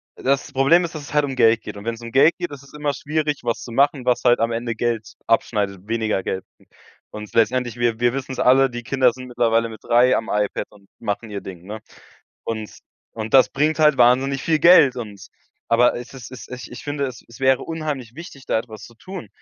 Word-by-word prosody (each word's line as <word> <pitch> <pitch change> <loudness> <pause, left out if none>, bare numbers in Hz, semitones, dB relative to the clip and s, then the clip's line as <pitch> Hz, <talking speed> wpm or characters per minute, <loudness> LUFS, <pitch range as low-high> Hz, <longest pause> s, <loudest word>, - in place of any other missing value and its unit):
das 135 +1 -1
Problem 140 +7 +4
ist, 170 -1 -5
dass 150 - -6
es 140 - -10
halt 150 0 +3
um 135 -2 -5
Geld 115 -2 +4
geht. - - -8
Und 100 - -10
wenn's 115 0 -4
um 115 0 -8
Geld 140 +5 +5
geht, 175 -2 -3
ist 140 -1 -10
es 140 - -18
immer 150 -1 -1
schwierig, 150 0 -2
was 115 -1 -1
zu 120 - -9
machen, 140 +1 +2
was 125 - +1
halt 120 -1 +4
am 115 +1 +1
Ende 115 0 -2
Geld 115 -1 -3
abschneidet, 105 -4 0
weniger 110 -4 -1
Geld 95 - -3 0.2
m - - -24 0.5
und 105 0 -7
s - - -20
letztendlich, 120 +1 +1
wir 120 -1 0
wir 120 0 +2
wissen's 135 -1 -5
alle, 130 +1 +4
die 120 0 -5
Kinder 130 0 +2
sind 130 +1 -10
mittlerweile 115 -2 +1
mit 110 -1 -12
3 125 +2 +4
am 110 - -4
iPad 105 -1 -1
und 100 -2 -20
machen 110 0 -4
ihr 100 -1 -5
Ding, 90 -3 -9
ne? 110 +1 -6 0.7
Und 110 -2 -5 0.4
und 110 -1 -6
das 130 - +7
bringt 155 +3 0
halt 150 -2 +5
wahnsinnig 130 +3 +3
viel 160 -1 +1
Geld. 155 -6 +6
Und 105 -5 -8 0.4
aber 120 +1 +4
es 120 +2 -8
es 130 -2 -10
es 130 - -10
ich 125 -1 -8
ich 120 - -10
finde, 145 -1 -2
es 125 -2 -9 0.2
wäre 130 -1 +3
unheimlich 150 -7 -5
wichtig, 140 -4 -11
da - - +1
etwas 110 -2 -8
zu 120 - -15
tun. 180 - -9
120 Hz, 230 wpm, -21 LUFS, 115-135 Hz, 0.7 s, das